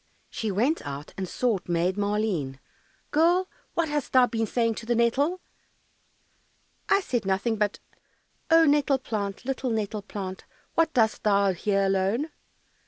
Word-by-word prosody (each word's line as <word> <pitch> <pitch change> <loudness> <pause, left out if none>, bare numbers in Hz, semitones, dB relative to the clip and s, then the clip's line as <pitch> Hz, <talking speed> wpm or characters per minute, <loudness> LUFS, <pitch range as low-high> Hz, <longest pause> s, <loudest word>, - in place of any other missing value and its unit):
She 220 - -3
went 240 - +1
out 145 0 -7
and 190 -2 -4
sought 225 -8 -1
Maid 175 +2 +1
Maleen. 200 -9 -1 0.5
"Girl, 345 +4 +3 0.3
what 335 -1 +1
hast 295 -2 -3
thou 255 -1 +7
been 225 -2 -2
saying 230 +1 +1
to 225 - -12
the 240 - +2
nettle?" 280 +10 +1 1.5
"I 395 - +4
said 245 - -1
nothing 195 +4 0
but, 210 -1 0 0.7
"Oh, 325 0 +6
nettle 285 -2 +3
plant, 210 -4 -4
Little 265 -1 -2
nettle 215 -2 -2
plant, 195 -2 -6 0.3
What 330 -1 +2
dost 220 -3 +2
thou 200 -2 +3
here 195 +2 +1
alone? 195 +10 0
220 Hz, 145 wpm, -26 LUFS, 195-270 Hz, 1.5 s, thou